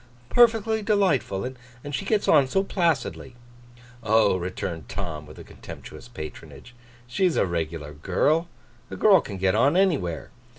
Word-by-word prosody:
'Perfectly 225 -2 +3
delightful. 195 - +1 0.4
And 145 - -7
she 195 - -3
gets 210 0 0
on 140 -2 +5
so 195 +9 +1
placidly.' 165 -9 -1 0.7
'Oh,' 110 -2 +3
returned 85 -3 -5
Tom, 80 -6 -5
with 75 - -12
contemptuous - - -11
patronage, 120 +4 -10 0.3
'she's 170 +9 0
a - - +3
regular 80 -3 -4
girl. 145 - +1 0.4
A - - -6
girl 200 -4 +5
can 100 - -7
get 95 0 +1
on 140 +10 +3
anywhere. 145 - 0
120 Hz, 135 wpm, -25 LUFS, -, 0.7 s, on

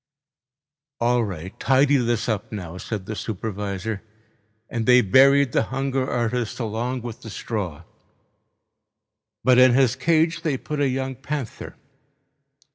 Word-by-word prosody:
"All 120 0 +2
right, 95 -3 -6
tidy 140 +1 +4
this 120 -3 0
up 105 -3 -2
now," 90 -5 -6
said 105 -2 -5
the 110 - -5
supervisor. 105 0 -4 0.7
And 115 -2 -3
they 125 0 +7
buried 135 +5 +5
the - - +2
hunger 135 0 -1
artist 120 0 -1
along 120 +2 -3
with 120 -2 -7
the 110 - -9
straw. 95 -8 -4 1.6
But 125 -1 +5
in 125 -1 +6
his 130 -2 +3
cage 160 +4 +2
they 155 -6 -1
put 150 +3 -5
a 140 -2 +2
young 130 +1 -2
panther. 140 -1 -6
120 Hz, 130 wpm, -23 LUFS, 110-135 Hz, 1.6 s, they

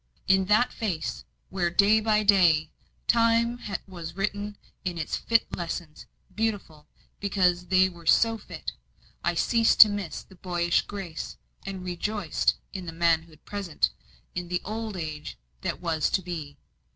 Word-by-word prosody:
In 190 0 +4
that 215 +5 +3
face, 160 - -3 0.3
where 180 -2 0
day 200 +5 +5
by 215 -1 +2
day 175 -7 +4 0.3
Time 235 +1 +3 0.3
was 170 -3 -8
writing 205 +1 -2 0.3
its 170 -4 -2
fit 230 -1 +1
lessons 170 -2 -5 0.3
beautiful, 200 -8 -3 0.3
because 180 -3 +1
they 185 0 +5
were 170 -3 -12
so 225 +5 +5
fit 225 - -7 0.5
I - - +1
ceased 230 -2 +3
to 215 - +11
miss 205 -5 -4
the - - -18
boyish 175 -1 +1
grace, 190 -6 -6 0.3
and 190 -1 -5
rejoiced 180 0 0 0.2
in 185 -2 -6
the - - -3
manhood 165 -1 0
present, 195 -6 -1 0.4
in 180 0 -4
the 180 0 -2
old 220 -1 -4
age 155 -3 -5 0.2
that - - -3
was 165 -3 +1
to 190 - -11
be. 160 -5 -6
185 Hz, 140 wpm, -27 LUFS, 170-210 Hz, 0.5 s, to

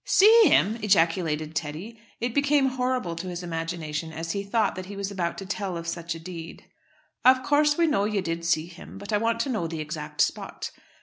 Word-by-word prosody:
"See 440 +3 +7
him!" 220 - +3
ejaculated 165 -5 +2
Teddy. 165 +11 -5 0.2
It 235 0 -2
became 285 -1 +3
horrible 250 -8 -1
to 175 +2 -5
his 180 0 -5
imagination 165 -2 -4
as 165 +1 -4
he 200 - -2
thought 205 +1 +1
that 185 0 -7
he 200 - -7
was 200 0 -3
about 175 -3 -2
to 195 - -6
tell 195 -2 -3
of 170 0 -6
such 170 0 -3
a - - -8
deed. 165 -1 -9 0.6
"Of 255 0 +6
course, 295 +1 +3
we 340 - +4
know 205 -11 +2
you 210 -2 0
did 165 -1 -3
see 165 -1 +1
him; 170 0 -12
but 200 +1 -6
I 210 - +3
want 230 +1 0
to 275 - -2
know 215 -10 -1
the 165 -1 -5
exact 155 -1 -4
spot." - - -2
185 Hz, 210 wpm, -26 LUFS, 165-230 Hz, 0.6 s, See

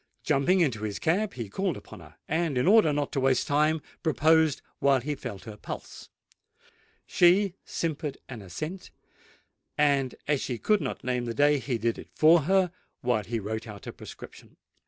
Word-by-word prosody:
Jumping 155 +6 +2
into 125 -10 +1
his 105 -2 -3
cab, 195 +6 0
he 115 -4 -5
called 185 - -2
upon - - -12
her, - - -15
and, 160 -3 0
in 125 - +2
order 200 -4 +6
not 145 -1 -1
to 140 - -1
waste 130 -1 +2
time, 150 +2 +2 0.2
proposed 160 -1 +3 0.2
while 140 -1 +4
he 145 +4 -3
felt 125 -8 -7
her 110 -3 -9
pulse: 105 - -8 1.0
she 180 +2 +4
simpered 150 -3 -3
an 120 -4 -8
assent—and, 145 - -4
as 145 -2 +1
she 125 - -3
could 210 - +2
not 135 - -4
name 125 -1 -1
the 115 -1 -4
day, 145 0 +4
he 125 -1 -2
did 115 +1 -1
it - - -11
for 160 +2 +6
her 190 -2 +3 0.3
while 120 -3 +1
he 115 +2 -2
wrote 110 +2 -4
out 105 -2 -10
a - - -6
prescription. - - -12
145 Hz, 175 wpm, -27 LUFS, 120-160 Hz, 1.0 s, order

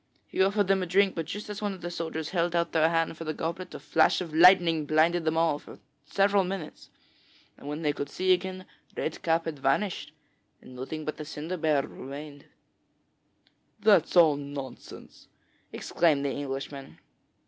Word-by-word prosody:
He - - -2
offered 200 +2 +3
them 195 0 +2
a 180 - -2
drink, 195 +2 +3
but 165 -2 -4
just 205 +5 -6
as 210 0 -6
one 205 -1 -1
of 185 - -11
the 175 +1 -5
soldiers 160 -2 -4
held 175 -1 0
out 170 0 0
his 160 -1 +4
hand 165 0 0
for 165 - -7
the 155 -1 -4
goblet, 170 +3 -4
a - - -6
flash - - +3
of 170 -4 -6
lightning 170 -2 +6
blinded 160 +2 +2
them 160 0 +1
all 165 -3 +2
three - - -13
for - - -23 0.3
several 200 +2 +3
minutes, 185 -4 -6 0.7
and - - -13
when 150 +3 -4
they 150 -1 +1
could 145 -1 -5
see 185 +4 +2
again, 185 0 -3 0.3
Red 155 - -3
Cap 165 0 +1
had 155 -4 -5
vanished, 150 +6 0 0.5
and 125 - -14
nothing 150 +5 -6
but 155 - -4
the 155 - -6
cider 155 +4 -5
barrel 155 -5 +1
remained.' 145 +1 -9 1.4
'That's 205 -3 +4
all 160 -4 +6
nonsense!' 140 -2 -9 0.4
exclaimed 150 -5 +1
the 140 - 0
Englishman. 135 0 -6
165 Hz, 180 wpm, -28 LUFS, 150-185 Hz, 1.4 s, lightning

